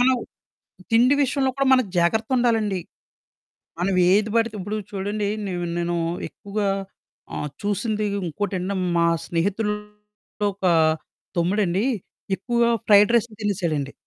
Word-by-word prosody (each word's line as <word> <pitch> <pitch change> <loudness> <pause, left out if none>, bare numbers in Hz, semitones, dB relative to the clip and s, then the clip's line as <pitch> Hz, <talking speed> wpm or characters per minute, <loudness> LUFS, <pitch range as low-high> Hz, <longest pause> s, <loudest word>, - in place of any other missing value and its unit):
మనం 255 +1 +5 0.8
తిండి 245 +5 +5
విషయంలో 270 0 +1
కూడా 275 0 +1
మనం 255 -2 +5
జాగ్రత్త 220 +6 +2
ఉండాలండి. 225 -6 +1 1.0
మనం 185 +2 0 0.2
ఏది 210 +2 +3
పడితే 230 -1 +2
ఇప్పుడు 205 +3 -3
చూడండి 205 +1 -2 0.2
నేను 175 -2 -3
నేను 175 0 -1 0.3
ఎక్కువగా 200 0 -3 0.7
ఆహ్, 150 - -3
చూసింది 210 +1 -1 0.2
ఇంకోటంటే 190 +2 -2 0.2
మా 170 - +3 0.2
స్నేహితుల్లో 210 +3 -3
ఒక 195 - -10 0.7
తమ్ముడండి 185 +3 +1 0.5
ఎక్కువగా 235 +3 +1 0.2
ఫ్రైడ్ 205 +1 +6
రైసులు 230 -1 +1
తినేసాడండి. 170 -9 -1
205 Hz, 110 wpm, -23 LUFS, 185-225 Hz, 1.0 s, ఫ్రైడ్